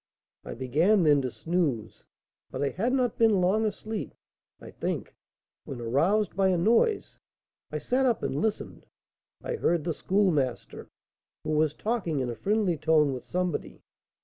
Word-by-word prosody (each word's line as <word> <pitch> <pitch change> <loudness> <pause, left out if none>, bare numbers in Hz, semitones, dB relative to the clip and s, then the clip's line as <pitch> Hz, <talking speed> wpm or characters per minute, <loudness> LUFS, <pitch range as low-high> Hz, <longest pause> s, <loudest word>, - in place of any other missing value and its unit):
I - - -7
began 160 - +2
then 145 -3 +4
to 130 - -2
snooze, 155 -6 -2 0.4
but 130 - -3
I 140 - +1
had 225 - -1
not 255 -4 0
been 220 -4 +4
long 195 +5 +2
asleep, 215 0 -4 0.4
I - - -11
think, - - -4 0.5
when, 130 - -7
aroused 165 - +1
by 195 0 +3
a 185 -1 +2
noise, 235 - +1 0.5
I - - -2
sat 260 +1 +1
up 235 - 0
and - - -2
listened. 220 -2 -3 0.6
I - - -3
heard 170 - +1
the 165 - -1
Schoolmaster, 165 -10 -1 0.5
who - - -3
was 155 0 +1
talking 210 - -2
in 125 -2 -2
a - - -6
friendly 195 - 0
tone 155 -2 +3
with 125 - -6
somebody. 180 -2 -3
180 Hz, 155 wpm, -27 LUFS, 145-215 Hz, 0.6 s, then